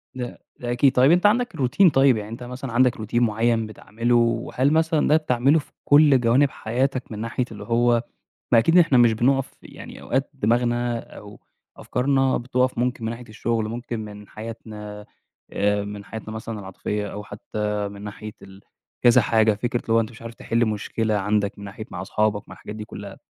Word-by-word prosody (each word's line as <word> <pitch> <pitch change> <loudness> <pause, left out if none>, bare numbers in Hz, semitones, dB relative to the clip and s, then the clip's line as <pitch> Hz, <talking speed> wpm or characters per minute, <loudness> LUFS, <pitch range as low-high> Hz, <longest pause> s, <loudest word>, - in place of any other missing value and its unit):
لأ 125 -1 -6 0.2
ده 120 0 -3
أكيد، 130 +2 +4
طيب 130 +4 +5
أنت 180 +3 +3
عندك 240 -1 +2
روتين 150 +7 +4
طيب 135 -4 +4
يعني 105 0 -6
أنت 115 +2 -8
مثلًا 125 +1 -7
عندك 125 +1 +3
روتين 115 +3 0
معين 115 0 +1
بتعمله؟ 115 +2 -2
وهل 120 +4 +1
مثلًا 160 -1 +2
ده 155 - +5
بتعمله 140 +1 +2
في - - -12
كل 145 -2 +6
جوانب 125 +4 +3
حياتك 130 +3 -2
من 105 - -6
ناحية 115 +3 -2
اللي - - -8
هو 120 0 +2 0.5
ما 115 - +8
أكيد 165 +9 +3
إحنا 165 -7 +5
مش 120 -2 +5
بنقف 135 +4 +1
يعني - - -11
أوقات 135 +2 -1
دماغنا 120 -1 0
أو 105 -2 -12 0.4
أفكارنا 135 +1 +1
بتقف 125 0 0
ممكن 120 -1 -1
من 115 - -1
ناحية 120 0 -9
الشغل 110 0 -2
ممكن 120 0 -5
من 105 -1 -9
حياتنا، 105 -2 -9 0.5
آآ 105 0 +1
من 100 -1 -7
حياتنا 110 +1 -7
مثلًا 110 -1 -6
العاطفية 105 +2 -4
أو 105 0 -6
حتى 105 0 -4
من 100 0 -10
ناحية 105 +1 -8
ال 95 0 -14 0.4
كذا 120 -1 +6
حاجة، 110 -1 +3
فكرة 120 +3 -2
اللي 115 - -2
هو 115 - +5
أنت 110 0 -2
مش 115 - -15
عارف 115 0 -8
تحل 115 +1 0
مشكلة 110 +1 -2
عندك 100 0 0
من 100 - -8
ناحية 100 +2 -8
مع 90 - -5
أصحابك 105 +2 -1
مع - - -9
الحاجات 105 - -9
دي 105 0 -7
كلها، 100 -2 -9
115 Hz, 190 wpm, -23 LUFS, 105-125 Hz, 0.5 s, ما